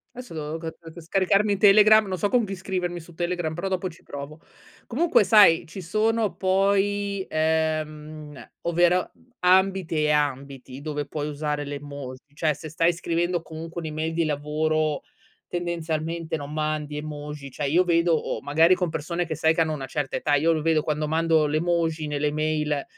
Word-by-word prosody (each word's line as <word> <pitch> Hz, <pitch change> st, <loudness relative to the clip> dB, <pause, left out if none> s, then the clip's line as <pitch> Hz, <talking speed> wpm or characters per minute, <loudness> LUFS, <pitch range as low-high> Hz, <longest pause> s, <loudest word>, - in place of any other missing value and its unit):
Adesso 250 Hz, -8 st, -9 dB
devo 155 Hz, +1 st, -4 dB
c 165 Hz, 0 st, -5 dB, 0.2 s
c 170 Hz, -, -10 dB
scaricarmi 195 Hz, +4 st, +2 dB
Telegram, 215 Hz, +2 st, +7 dB
non 185 Hz, -2 st, -4 dB
so 205 Hz, -, +1 dB
con 245 Hz, -1 st, +2 dB
chi 195 Hz, -1 st, -5 dB
scrivermi 180 Hz, -2 st, -3 dB
su 170 Hz, 0 st, -13 dB
Telegram, 175 Hz, -2 st, -2 dB
però 185 Hz, +3 st, -3 dB
dopo 185 Hz, 0 st, -1 dB
ci 170 Hz, -, -15 dB
provo. 145 Hz, +2 st, -8 dB, 0.5 s
Comunque 310 Hz, +1 st, +3 dB
sai, 200 Hz, -4 st, +6 dB
ci 190 Hz, +4 st, -8 dB
sono 215 Hz, +4 st, 0 dB
poi, 200 Hz, +1 st, +1 dB
ehm, 155 Hz, -2 st, -2 dB
ovvero 175 Hz, +1 st, +2 dB, 0.3 s
ambiti 185 Hz, -1 st, +3 dB
e 150 Hz, 0 st, +2 dB
ambiti 140 Hz, -2 st, -2 dB
dove 150 Hz, -1 st, -4 dB
puoi 150 Hz, +1 st, -4 dB
usare 150 Hz, 0 st, -3 dB
le 145 Hz, 0 st, -5 dB
emoji, 140 Hz, -1 st, -9 dB
cioè 155 Hz, 0 st, +1 dB
se 155 Hz, +2 st, -9 dB
stai 165 Hz, +2 st, +2 dB
scrivendo 175 Hz, +1 st, -1 dB
comunque 165 Hz, +1 st, -7 dB
un'email 155 Hz, +1 st, -3 dB
di 165 Hz, 0 st, +1 dB
lavoro 155 Hz, 0 st, 0 dB, 0.5 s
tendenzialmente 165 Hz, -1 st, -3 dB
non 145 Hz, -1 st, -7 dB
mandi 155 Hz, -1 st, -2 dB
emoji, 150 Hz, -1 st, -7 dB
cioè 145 Hz, +1 st, -2 dB
io 175 Hz, +6 st, +4 dB
vedo 170 Hz, 0 st, +2 dB
o 155 Hz, -, -2 dB
magari 160 Hz, +5 st, +4 dB
con 180 Hz, -1 st, -1 dB
persone 170 Hz, +3 st, -3 dB
che 160 Hz, -1 st, -4 dB
sai 160 Hz, +1 st, +3 dB
che 165 Hz, -, 0 dB
hanno 160 Hz, -1 st, +2 dB
una 135 Hz, -3 st, -5 dB
certa 135 Hz, 0 st, -3 dB
età 145 Hz, -, +1 dB
io 155 Hz, +4 st, +3 dB
lo 155 Hz, -, 0 dB
vedo 160 Hz, -1 st, +2 dB
quando 150 Hz, 0 st, -1 dB
mando 160 Hz, -1 st, +2 dB
l'emoji 160 Hz, 0 st, 0 dB
nelle 150 Hz, 0 st, 0 dB
mail 150 Hz, -1 st, -1 dB
160 Hz, 170 wpm, -25 LUFS, 150-175 Hz, 0.5 s, Telegram